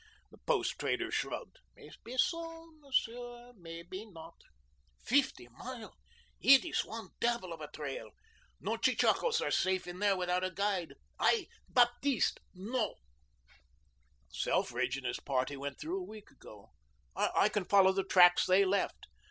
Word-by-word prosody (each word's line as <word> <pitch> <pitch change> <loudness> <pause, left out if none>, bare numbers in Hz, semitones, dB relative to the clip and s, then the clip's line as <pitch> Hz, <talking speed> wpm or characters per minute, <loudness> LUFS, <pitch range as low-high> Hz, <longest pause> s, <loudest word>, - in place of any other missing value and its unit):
The - - -17
post - - 0
trader - - -1
shrugged. - - -4 0.2
"Maybeso, 330 +6 -3
Monsieur 245 -3 -3
maybe 170 +2 -8
not. 165 -6 -12 0.7
Feefty 260 - +1
Mile 235 - -9 0.4
it 275 +4 +7
ees 335 - 0
one 225 0 -8
devil 235 -7 0
of 165 - -10
a 150 - -5
trail. 145 -3 -6 0.5
No - - -2
chechakoes 470 -1 +2
are - - -1
safe 185 0 +1
in 175 +1 -8
there 200 -2 +2
without 180 0 0
a 185 - 0
guide. 190 -1 -2 0.2
I, 430 -6 +2 0.2
Baptiste, 245 +1 +2 0.2
know." 215 +5 -2 1.3
"Selfridge 125 - -1
and 135 - -8
his - - -2
party 135 +1 -1
went 140 0 -6
through 355 +5 -3
a - - -5
week 215 -1 -12
ago. 105 -2 -15 0.4
I - - +2
can 205 -3 -2
follow 195 -1 +5
the 195 0 -1
tracks 180 -2 +6
they 190 +2 +5
left." 195 +1 -1
200 Hz, 140 wpm, -33 LUFS, 175-245 Hz, 1.3 s, it